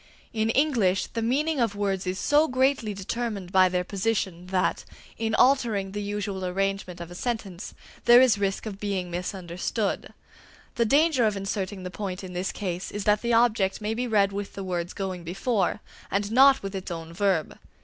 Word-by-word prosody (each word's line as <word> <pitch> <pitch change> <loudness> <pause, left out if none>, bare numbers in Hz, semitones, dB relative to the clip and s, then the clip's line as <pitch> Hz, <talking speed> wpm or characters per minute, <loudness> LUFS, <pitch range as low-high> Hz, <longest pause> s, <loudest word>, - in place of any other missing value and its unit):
In 220 0 0
English, 230 -9 +2
the 230 - -1
meaning 285 +6 +1
of 230 -4 +1
words 195 -2 -1
is 185 +1 -1
so 295 +7 +3
greatly 260 -4 +1
determined 200 -1 -4
by 185 -1 +5
their 180 0 0
position 190 -2 -2
that, 185 -1 0 0.4
in 220 -1 0
altering 230 -7 +3
the 205 +1 -4
usual 205 -2 -3
arrangement 190 -1 -2
of 170 0 -8
a - - -7
sentence, 200 -3 -4 0.3
there 240 0 +9
is 250 -5 +4
risk 195 +1 -1
of 200 -3 -6
being 195 -4 -2
misunderstood. 180 +3 -3 0.6
The 235 - +1
danger 285 +1 +3
of 210 -2 -1
inserting 195 -1 -3
the 180 - -5
point 190 -1 -5
in 185 -1 -7
this 180 +2 -2
case 180 -2 -4
is 205 - -4
that 210 +1 +3
the 235 0 0
object 220 -5 +3
may 215 +1 -2
be 245 +2 -2
read 200 -3 +3
with 200 0 -5
the 195 - -6
words 175 -2 -3
going 190 -3 -4
before, 195 +3 -1 0.3
and 200 +1 -1
not 270 +1 +6
with 195 0 -5
its 190 -1 -5
own 165 -1 -6
verb. 190 -4 0
200 Hz, 185 wpm, -26 LUFS, 185-230 Hz, 0.6 s, there